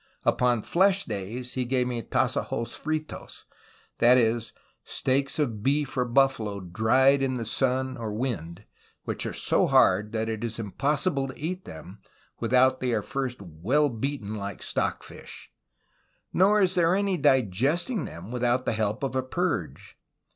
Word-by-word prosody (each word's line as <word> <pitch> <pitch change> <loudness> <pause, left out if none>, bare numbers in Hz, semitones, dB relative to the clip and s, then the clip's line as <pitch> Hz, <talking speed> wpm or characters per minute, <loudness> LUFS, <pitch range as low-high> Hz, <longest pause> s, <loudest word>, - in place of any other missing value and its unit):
Upon 120 -3 +2
flesh 195 +2 +3
days 115 +5 -5
he 130 - -1
gave 125 0 0
me 120 -2 -2
Tassajos 125 -1 -1
FritoSy 155 0 -5 0.6
that 120 +2 +6
is, 115 -1 +1 0.3
steaks 135 +1 -1
of 120 -9 -1
beef 140 +3 0
or 125 -1 +1
buffalo, 120 -5 +1
dry'd 115 +9 +3
in 130 -1 0
the 115 - -4
sun 130 +2 0
or 115 -2 -4
wind, 105 - -4 0.4
which - - -3
are - - -3
so - - +2
hard 105 +1 +4
that 110 0 -1
it 110 0 -3
is 115 -1 -3
impossible 135 - 0
to 130 - -9
eat 180 +4 -4
them, 90 +5 -10 0.4
without 130 +1 +3
they 125 -2 -1
are 105 -2 0
first 125 -4 -4
well 105 - +1
beaten 120 -3 -4
like 100 -2 -6
stock - - -1
fish; - - -11 0.8
nor 200 +4 +4
is 185 -1 +2
there 175 0 +3
any 200 -1 +1
digesting 140 - +1
them 90 +7 -9
without 125 +1 0
the - - 0
help 110 +2 -1
of 135 -1 -2
a 130 - +2
purge. 130 - -3
125 Hz, 155 wpm, -26 LUFS, 110-140 Hz, 0.8 s, that